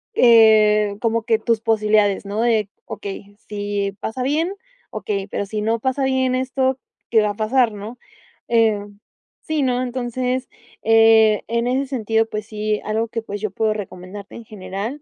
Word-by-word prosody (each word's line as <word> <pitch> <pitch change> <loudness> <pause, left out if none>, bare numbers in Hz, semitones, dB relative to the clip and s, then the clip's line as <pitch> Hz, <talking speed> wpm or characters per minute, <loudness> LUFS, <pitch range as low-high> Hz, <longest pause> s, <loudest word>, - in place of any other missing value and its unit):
eh, 215 -3 +5
como 230 0 +1
que 225 0 +2
tus 230 -1 0
posibilidades, 215 -2 +2
¿no? 205 +2 -2
De 225 -4 +1 0.2
okey, 200 0 -8
si 205 -1 -2
pasa 250 +5 -4
bien, 315 +7 0 0.4
okey, 200 -2 -3
pero 200 - -3
si 210 +1 -4
no 225 +2 0
pasa 260 +3 -1
bien 260 -1 +1
esto, 260 0 0 0.3
¿Qué 225 -2 +5
va 210 -1 +1
a - - -5
pasar? 230 +3 +2
¿No? 210 +4 -8 0.5
Eh, 225 -3 +3 0.6
sí, 315 -1 -2
¿no? 250 -1 +1
Entonces, 250 +1 -2 0.3
eh, 225 -1 +5
en 235 +1 -1
ese 260 +2 0
sentido, 225 -4 0
pues 215 -1 -5
sí, 215 -1 -2
algo 220 +2 -1
que, 230 0 -3
pues, 205 -2 -6
yo 215 - -1
puedo 215 +2 0
recomendarte 195 -1 -8
en 235 - -9
general, 215 +5 -6
220 Hz, 165 wpm, -21 LUFS, 210-245 Hz, 0.6 s, eh